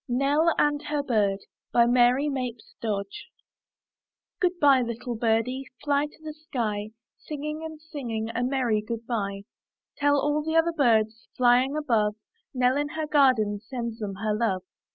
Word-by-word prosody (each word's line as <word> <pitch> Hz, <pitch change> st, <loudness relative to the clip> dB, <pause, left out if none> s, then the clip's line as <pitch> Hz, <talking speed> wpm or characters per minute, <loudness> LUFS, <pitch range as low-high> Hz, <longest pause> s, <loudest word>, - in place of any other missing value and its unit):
NELL 285 Hz, +6 st, +3 dB
AND 295 Hz, 0 st, +2 dB
HER 295 Hz, -1 st, -1 dB
BIRD* 205 Hz, -6 st, +1 dB, 0.3 s
Mary 245 Hz, +3 st, +4 dB
Mapes 250 Hz, -5 st, -4 dB
Dodge 200 Hz, -, -4 dB, 1.1 s
Good 360 Hz, -3 st, +1 dB
by, 280 Hz, -4 st, +6 dB
little 235 Hz, +1 st, -4 dB
birdie! 230 Hz, +4 st, 0 dB, 0.2 s
Fly 290 Hz, 0 st, +2 dB
to 295 Hz, -, -20 dB
the 310 Hz, -1 st, -6 dB
sky, 225 Hz, -9 st, -3 dB, 0.3 s
Singing 300 Hz, +1 st, -5 dB
and 315 Hz, -1 st, -7 dB
singing 245 Hz, -8 st, -5 dB
A 240 Hz, -, -1 dB
merry 245 Hz, -4 st, +1 dB
good 230 Hz, +1 st, -5 dB
by. 200 Hz, -4 st, -3 dB, 0.5 s
Tell 285 Hz, 0 st, +3 dB
all 295 Hz, +2 st, +1 dB
the 320 Hz, +1 st, -2 dB
other 330 Hz, +1 st, +3 dB
birds, 225 Hz, -5 st, +2 dB
Flying 255 Hz, +3 st, +4 dB
above, 225 Hz, -8 st, +1 dB, 0.4 s
Nell, 255 Hz, 0 st, +2 dB
in 290 Hz, 0 st, 0 dB
the 315 Hz, +1 st, -3 dB
garden. 255 Hz, -9 st, +3 dB
Sends 235 Hz, 0 st, -5 dB
them 200 Hz, -3 st, -4 dB
her 210 Hz, +2 st, -1 dB
love. 210 Hz, -4 st, 0 dB
250 Hz, 150 wpm, -26 LUFS, 225-290 Hz, 1.1 s, by